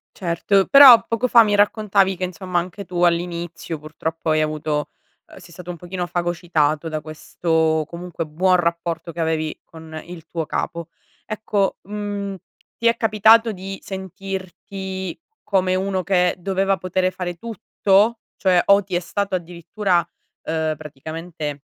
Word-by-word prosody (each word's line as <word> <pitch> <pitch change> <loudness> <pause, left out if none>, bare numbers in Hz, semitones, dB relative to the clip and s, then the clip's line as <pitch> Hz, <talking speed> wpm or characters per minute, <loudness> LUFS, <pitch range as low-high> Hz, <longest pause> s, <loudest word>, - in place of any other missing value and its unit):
Certo. 190 +2 +1
Però 275 -4 +9
poco 230 +2 0
fa 235 -2 +7
mi 205 -1 +1
raccontavi 205 -2 +2
che 185 - -4
insomma 180 0 -2
anche 180 +3 -6
tu 175 -1 -2
all'inizio, 170 -2 -1
purtroppo, 160 +1 -4
hai 155 - +3
avuto, 155 -1 -2 0.4
uhm - - -15
sei 170 - -15
stato 180 +1 -10
un 175 - -5
pochino 175 +1 -5
fagocitato 170 -3 0
da 155 -1 -3
questo, 160 0 0
comunque, 170 -1 -6
buon 180 +5 +2
rapporto 170 -1 -2
che 170 - -10
avevi 160 -1 -1
con 160 -1 -10
il 170 -2 -10
tuo 165 -1 -3
capo. 170 +2 -4 0.4
Ecco, 210 -2 -1
mhmm, 205 0 -4 0.4
ti 230 - +1
è 230 - +3
capitato 225 +1 +5
di 195 0 -7
sentirti 190 0 -6 0.3
come 185 -2 +1
uno 190 0 -1
che 180 -1 +2
doveva 195 +1 0
potere 185 0 0
fare 180 -1 -5
tutto? 215 +1 +1 0.2
Cioè 180 -2 +3
o 200 0 +5
ti 185 -2 -4
è - - +2
stato 195 +2 -2
addirittura, 175 +2 -1 0.5
uhm, 160 -1 -1
praticamente 155 0 -7
180 Hz, 145 wpm, -21 LUFS, 165-195 Hz, 0.5 s, Però